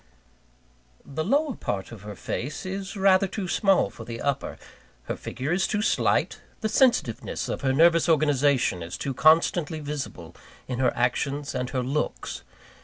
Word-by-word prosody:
The 150 +3 -3
lower 285 - +1
part 100 - -4
of 110 -4 -10
her 105 0 -8
face 140 - -4
is 195 +2 -5
rather 195 0 +4
too 190 0 -4
small 195 - +2
for 115 - -10
the 115 0 -7
upper, 140 0 -2 0.5
her - - -4
figure 135 +4 -4
is 190 +2 +2
too 210 0 -1
slight, - - +1 0.2
the 220 - 0
sensitiveness 225 - +1
of - - -3
her 135 - +1
nervous 165 +4 +4
organization 145 - +2
is 85 +2 -6
too 135 - -3
constantly 160 +2 +3
visible 145 -1 -6 0.3
in 125 -1 -3
her 130 - +3
actions 140 +4 -1
and 125 -1 -2
her 130 -2 -1
looks. 140 +4 -3
145 Hz, 160 wpm, -26 LUFS, 125-185 Hz, 0.5 s, rather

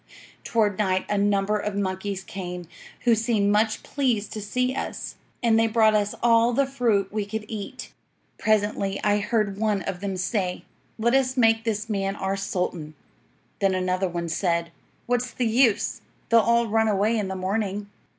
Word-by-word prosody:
Toward 215 -3 +1
night 190 -2 +1
a 210 - +1
number 205 +1 +2
of 210 -1 -3
monkeys 190 0 -2
came, 180 -3 -6 0.3
who 240 - +4
seemed 220 -2 +2
much 215 +1 +1
pleased 240 -7 -1
to 215 - -5
see 250 +5 -1
us, - - -4 0.3
and 225 -1 +4
they 225 - +3
brought 220 -1 +4
us 210 -1 +1
all 230 0 +4
the 275 +3 +3
fruit 230 -8 0
we 210 -1 0
could 210 +1 -5
eat. 215 -3 -7 0.5
"'Presently 205 -2 +1
I 205 0 +3
heard 205 -2 -1
one 210 -3 +1
of 180 - -4
them 195 -1 -3
say, 185 0 -1 0.3
"Let 235 +2 +1
us 260 -1 +2
make 225 -1 +3
this 220 0 -1
man 195 -2 -1
our 195 -1 -2
sultan." 180 -5 -3 0.6
Then 195 -1 +2
another 185 0 0
one 170 -1 -3
said: 170 0 0 0.3
"What's 245 +1 0
the 245 +1 -2
use? 230 -1 +2 0.3
They'll 230 - +6
all 235 +1 +3
run 225 0 +2
away 210 +2 +2
in 210 -3 -1
the 190 - -4
morning." 200 +2 -2
210 Hz, 170 wpm, -25 LUFS, 195-225 Hz, 0.6 s, They'll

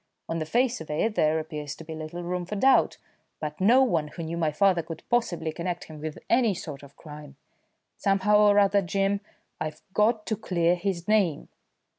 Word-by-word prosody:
"On 165 - -2
the 155 - -4
face 245 +3 +1
of 160 - -9
it 165 +9 0
there 155 -4 +2
appears 150 -2 -5
to - - -11
be 160 0 -8
little 160 +2 -6
room 180 +1 -2
for 185 +4 -5
doubt, 265 +6 +4 0.4
but 150 +2 -5
no 245 +7 +6
one 165 -12 +1
who 165 - -7
knew 165 +1 -4
my 160 -2 0
father 185 +2 +3
could 165 0 -9
possibly 210 -9 0
connect 175 +2 -4
him 155 -2 -11
with 155 -1 -5
any 230 -4 +3
sort 150 -5 -7
of 140 0 -15
crime. 150 -2 -11 0.6
Somehow 200 +1 +3
or 205 -1 +5
other, 200 0 +4
Jim, 195 +2 0 0.4
I've 155 -1 -5
got 215 +1 +2
to 220 - -1
clear 175 -5 +1
his 180 -1 -3
name." 200 -8 +1
175 Hz, 195 wpm, -26 LUFS, 155-205 Hz, 0.6 s, no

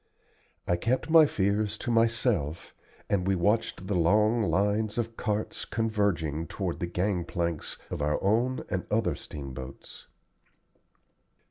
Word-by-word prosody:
I 90 - +2
kept 130 - -1
my 160 -2 +8
fears 105 -1 0
to 120 - -3
myself, 115 - +1 0.3
and 95 -3 0
we 95 - +3
watched 100 +1 0
the 100 - -2
long 105 +7 +3
lines 105 +2 +1
of 115 -1 -2
carts 105 -1 -2
converging 100 -9 -1
toward 95 -4 -3
the 85 - -2
gang 90 +1 0
planks 85 -2 -3
of - - -3
our 75 +1 +1
own 120 +6 +1
and 90 -2 -2
other 105 -6 +1
steamboats. 65 -2 -9
100 Hz, 130 wpm, -28 LUFS, 85-110 Hz, 0.3 s, my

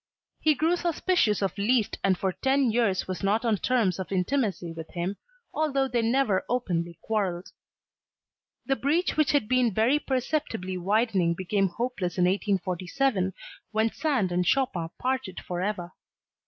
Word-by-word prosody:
He 310 -1 +3
grew 325 +5 +2
suspicious 340 - +1
of 195 - -1
Liszt 225 +1 +1
and 190 -2 +3
for 190 +1 0
ten 265 +3 +1
years 220 -5 +1
was 185 -1 -4
not 210 +4 +1
on 220 -3 +2
terms 210 -6 +1
of 190 - -5
intimacy 190 -3 -1
with 160 -1 -8
him 180 +3 -2 0.4
although 280 -3 +1
they 245 -2 0
never 230 -4 +2
openly 175 -9 -1
quarrelled. 195 -5 -2 1.1
The 270 - +1
breach 320 +6 +1
which 310 -3 +3
had 285 -8 +2
been 250 -1 +3
very 230 +9 +3
perceptibly 255 -9 -2
widening 190 -2 +1
became 195 +2 0
hopeless 195 -2 -3
in 180 - +3
1847, 190 +3 0 0.4
when 220 +1 +1
Sand 260 - 0
and 180 +1 +1
Chopin 180 -6 +1
parted 255 -7 -2
forever. 180 0 -3
215 Hz, 145 wpm, -27 LUFS, 185-260 Hz, 1.1 s, He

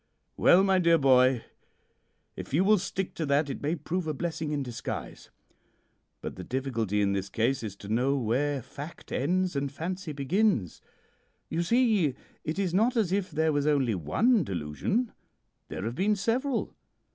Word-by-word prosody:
"'Well, 185 +2 +6
my 190 -1 +3
dear 170 -2 +5
boy, 130 -3 +4 0.9
if - - -5
you 175 - +4
will 210 +1 +5
stick 190 0 -3
to 160 - -3
that 140 +1 +2
it - - -6
may 150 +4 0
prove 170 +2 -3
a 155 - -2
blessing 160 0 -3
in 145 -2 -1
disguise. 120 -3 -6 0.9
But - - -6
the 90 - -6
difficulty 115 -4 -1
in 100 0 +1
this 100 0 -2
case 120 +6 0
is 105 -4 -5
to 100 - -11
know 125 +6 +1
where 135 +3 0
fact 145 +6 -10
ends 180 +5 0
and 140 0 -1
fancy 170 +3 -4
begins. 145 - 0 0.7
You 165 - 0
see, 210 - +2 0.3
it 155 +3 -3
is 190 -4 0
not 225 +7 +3
as 205 -6 +2
if 195 -1 0
there 160 0 +1
was 145 0 +1
only 135 -6 +2
one 200 - +2
delusion. 95 - -2 0.6
There 95 - -5
have 115 - -2
been 200 +9 +1
several. 245 +6 -1
150 Hz, 170 wpm, -28 LUFS, 130-185 Hz, 0.9 s, Well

